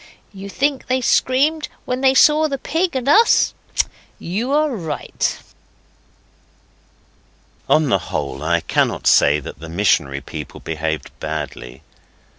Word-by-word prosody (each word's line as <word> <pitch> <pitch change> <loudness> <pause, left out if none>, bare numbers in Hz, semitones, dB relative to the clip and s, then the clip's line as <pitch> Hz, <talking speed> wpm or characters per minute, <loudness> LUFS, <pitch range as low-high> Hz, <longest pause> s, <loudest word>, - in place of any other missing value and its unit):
You 195 0 -9
think 275 +5 -1
they 255 +1 +1
screamed 280 +5 +1 0.2
when 250 +1 -2
they 265 0 +4
saw 305 +3 +5
the 275 -2 -3
Pig 335 +4 -1
and 260 0 -2
Us? 445 +11 +4 0.6
You 215 +10 -3
are 300 -2 +1
right. 160 -7 -3 2.3
On 155 -3 +3
the 100 - +2
whole, - - -4
I - - +1
cannot - - 0
say 75 +1 +5
that 70 - -10
the 80 +1 -9
missionary 80 -6 +1
people - - -8
behaved 80 -1 -4
badly. 75 -4 -6
230 Hz, 125 wpm, -19 LUFS, -, 2.3 s, saw